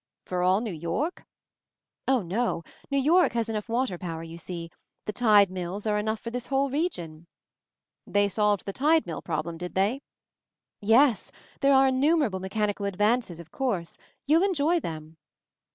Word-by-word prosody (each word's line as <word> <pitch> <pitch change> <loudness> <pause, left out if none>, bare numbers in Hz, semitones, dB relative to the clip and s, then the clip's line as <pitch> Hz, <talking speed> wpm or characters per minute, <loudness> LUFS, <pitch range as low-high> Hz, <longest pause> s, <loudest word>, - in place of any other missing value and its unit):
"For 180 -1 -2
all 185 +3 +3
New 225 -5 -4
York?" 170 - -3 0.8
"Oh, 260 -5 +3
no. 185 -1 -1 0.3
New 280 - 0
York 325 +5 +4
has 230 -1 -1
enough 215 0 -4
water 230 -6 -1
power, 165 -2 -5
you 165 0 -9
see. 170 -1 -7 0.3
The 210 - -3
tide 205 -4 +5
mills 185 +3 -5
are 210 -1 +1
enough 220 +1 -2
for 230 - -6
this 245 0 -5
whole 275 0 +1
region." 175 - -3 0.8
"They 205 0 +2
solved 210 -1 +1
the 195 - -4
tide 310 +6 +3
mill 165 - -5
problem, 165 0 -4
did 180 0 -6
they?" 205 +8 +1 0.8
"Yes. 230 +3 +3 0.3
There 275 -1 +4
are 265 0 +5
innumerable 265 - +2
mechani 205 +2 -1
cal 200 - -3
advances, 210 -2 0
of 170 -1 -12
course. 210 -11 -3 0.3
You'll 315 +4 +4
en 390 -1 +1
j 285 - 0
oy 340 +3 +3
them." 160 - -7
210 Hz, 170 wpm, -27 LUFS, 180-265 Hz, 0.8 s, tide